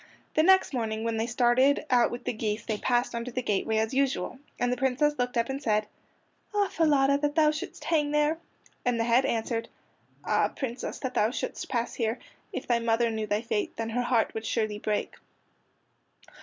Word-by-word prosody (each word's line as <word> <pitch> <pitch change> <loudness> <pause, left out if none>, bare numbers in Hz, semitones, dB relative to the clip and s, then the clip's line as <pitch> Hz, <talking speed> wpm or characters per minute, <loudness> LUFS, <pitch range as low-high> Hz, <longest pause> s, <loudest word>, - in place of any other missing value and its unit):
The - - +4
next 380 -1 +5
morning 220 -3 -2
when 230 -1 -1
they 225 +1 0
started 250 +4 +3
out 245 -1 +5
with 240 - -6
the - - -2
geese 215 -1 -3
they 215 -2 -2
passed 245 0 +1
under 235 +1 -3
the 250 +1 -3
gateway 220 +1 0
as 220 +3 0
usual, 270 0 0 0.2
and 245 0 +1
the - - -3
Princess 270 +4 +2
looked 245 0 -1
up 230 0 +2
and 270 +1 -4
said: 215 -4 +1 0.7
"Ah, 405 -1 +2
Falada, 280 -3 +3
that 290 0 -1
thou 305 -2 +5
shouldst 320 +5 -6
hang 300 -3 +1
there!" 300 +2 +2 0.4
And 245 -2 +1
the - - +2
head 240 +3 +3
answered: 230 -2 -1 0.6
"Ah, - - +3
Princess, 250 -2 -5
that 260 -2 -4
thou 215 - +3
shouldst 250 - -4
pass 235 -1 -1
here! 230 0 -1 0.3
If - - -5
thy 240 -1 +2
mother 230 0 +1
knew 220 -1 -3
thy 210 +2 0
fate, 220 -2 -2
Then 225 0 -3
her 245 +2 0
heart 240 -2 +1
would 220 0 -4
surely 215 -2 -1
break." 210 -1 -2
240 Hz, 195 wpm, -28 LUFS, 225-270 Hz, 0.7 s, next